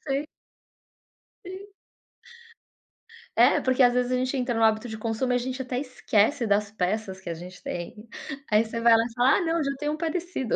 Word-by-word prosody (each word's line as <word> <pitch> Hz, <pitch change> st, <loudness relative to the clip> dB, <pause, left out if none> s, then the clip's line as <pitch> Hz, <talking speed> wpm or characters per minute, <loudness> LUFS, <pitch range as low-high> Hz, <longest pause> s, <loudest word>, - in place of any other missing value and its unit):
Sei. 275 Hz, +1 st, -1 dB, 1.2 s
Sim. 380 Hz, +2 st, -8 dB, 1.7 s
É, -, -, +5 dB
porque 260 Hz, 0 st, +3 dB
às 245 Hz, -1 st, +5 dB
vezes, 250 Hz, 0 st, 0 dB
a -, -, +2 dB
gente 255 Hz, +2 st, -1 dB
entra 250 Hz, -2 st, -1 dB
no 225 Hz, -, +1 dB
hábito 220 Hz, +1 st, +2 dB
de 220 Hz, -, -6 dB
consumo 225 Hz, +3 st, -2 dB
e -, -, +3 dB
a -, -, +4 dB
gente 255 Hz, +2 st, -4 dB
até 250 Hz, -1 st, -3 dB
esquece 255 Hz, -1 st, +1 dB
das 205 Hz, 0 st, +1 dB
peças 195 Hz, 0 st, -2 dB
que 185 Hz, -, -7 dB
a -, -, -2 dB
gente 180 Hz, +2 st, -11 dB
tem. 210 Hz, +6 st, -7 dB, 0.4 s
Aí 215 Hz, +2 st, +4 dB
você 230 Hz, +1 st, -5 dB
vai 235 Hz, 0 st, +6 dB
lá 225 Hz, -, +3 dB
e 235 Hz, -, -7 dB
fala: 245 Hz, +3 st, +4 dB
"Ah -, -, 0 dB
não, 330 Hz, -2 st, 0 dB
já 275 Hz, -, -1 dB
tenho 295 Hz, 0 st, -1 dB
um -, -, -4 dB
parecido". 330 Hz, -, -2 dB
245 Hz, 205 wpm, -26 LUFS, 220-270 Hz, 1.7 s, vai